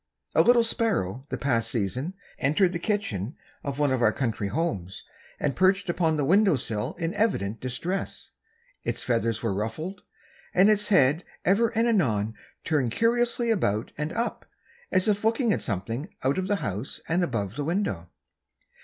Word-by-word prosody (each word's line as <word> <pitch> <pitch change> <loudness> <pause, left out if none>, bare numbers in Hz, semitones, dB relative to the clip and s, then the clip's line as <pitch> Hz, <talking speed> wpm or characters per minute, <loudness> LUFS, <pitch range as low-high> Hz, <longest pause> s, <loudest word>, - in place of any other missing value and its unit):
A - - +6
little 240 -1 +5
sparrow 200 - 0
the 130 - -2
past 115 -4 0
season 125 - -2 0.2
entered 175 +7 +3
the 170 - -2
kitchen 165 - -2 0.3
of 140 -1 -3
one 145 -2 +2
of 130 -2 +1
our - - +5
country 115 -6 -2
homes, 100 - -3 0.4
and 145 - 0
perched 190 +1 +3
upon 165 -3 +1
the 145 - +1
window 195 +2 +5
sill 110 -4 -3
in 165 0 -3
evident 150 - 0
distress. 170 +10 -3 0.5
Its - - -2
feathers 115 -2 0
were 115 -4 0
ruffled, 115 - -4 0.5
and 195 +4 +6
its 210 0 +2
head 160 -3 +4 0.2
ever 205 +5 +4
and 230 +1 +3
anon 110 - +1 0.3
turned 145 -7 +1
curiously 235 - +2
around 110 - 0
and 150 +2 -3
up, 235 +1 -3 0.4
as 185 - +2
if 205 -1 +1
looking 225 0 +2
at - - -1
something 115 - -3
out 135 +7 +2
of 185 - -2
the 205 - +2
house 100 +7 -3
and 175 +2 +2
above 110 - -2
the 145 - -2
window. 145 - -1
150 Hz, 165 wpm, -26 LUFS, -, 0.5 s, A